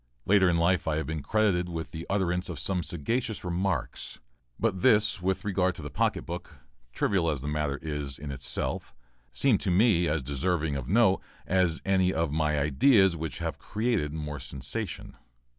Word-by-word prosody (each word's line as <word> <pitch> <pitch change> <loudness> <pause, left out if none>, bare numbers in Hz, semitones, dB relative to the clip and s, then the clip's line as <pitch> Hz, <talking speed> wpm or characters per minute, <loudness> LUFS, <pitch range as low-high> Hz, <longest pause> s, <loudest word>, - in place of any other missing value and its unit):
Later 95 -1 +5
in 85 - +2
life 85 0 +2
I 80 - +1
have 80 - -1
been 80 -1 -3
credited 95 -2 +1
with 80 -1 -5
the 80 0 -7
utterance 90 -2 0
of - - -5
some 95 -2 -1
sagacious 110 - -2
remarks, 90 +2 -2 0.4
but 100 -5 0
this 105 -1 +4
with 95 +3 -1
regard 95 -3 +1
to 80 - -9
the 75 - -6
pocket - - 0
book, 85 -1 -7 0.4
trivial 85 +5 +1
as 75 -4 -1
the 70 - -5
matter 75 -2 -1
is 75 -3 -3
in 70 -1 -6
itself, 65 -2 -4 0.4
seems 130 -7 +2
to - - +1
me 90 -1 +4
quite 75 - +1
as 75 - -2
deserving 75 +3 -1
of 70 -1 -4
note 105 -2 +4 0.2
as 90 -3 +1
any 95 -1 +3
of 80 -4 0
my 75 0 +1
ideas 90 - +4
which 80 -1 -4
have - - -4
created 105 -8 -1
more 75 -2 -5
sensation. 70 - -6
85 Hz, 180 wpm, -28 LUFS, 75-95 Hz, 0.4 s, Later